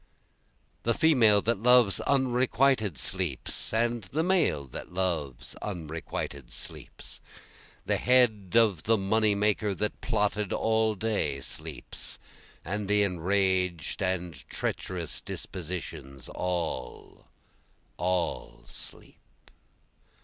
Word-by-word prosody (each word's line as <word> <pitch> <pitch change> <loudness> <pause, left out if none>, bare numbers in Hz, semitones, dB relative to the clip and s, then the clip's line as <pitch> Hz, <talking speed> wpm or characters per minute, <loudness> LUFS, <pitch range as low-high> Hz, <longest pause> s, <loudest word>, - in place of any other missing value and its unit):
The 115 -1 +1
female 115 -11 +5
that 115 -2 0
loves 125 -4 +5
unrequited 130 - +2
sleeps, - - -2
And 115 0 +1
the 150 - -1
male 170 - +2
that 65 - -8
loves 85 -8 -2
unrequited 80 -7 -5
sleeps, - - -7 0.6
The - - +1
head 115 -7 +3
of 110 -8 +4
the 115 +4 +3
money 105 +1 +2
maker 105 0 +1
that 105 +3 -2
plotted 105 -1 0
all 110 -1 +2
day 100 -10 -1
sleeps, 80 -2 -4 0.5
And 100 +4 -2
the 105 0 +4
enraged 90 -2 0
and 90 -2 -1 0.2
treacherous 85 -4 -2
dispositions, 80 -7 -6
all, 90 -3 -4 0.7
all 90 +1 -1
sleep. - - -8
100 Hz, 100 wpm, -28 LUFS, 85-110 Hz, 0.7 s, female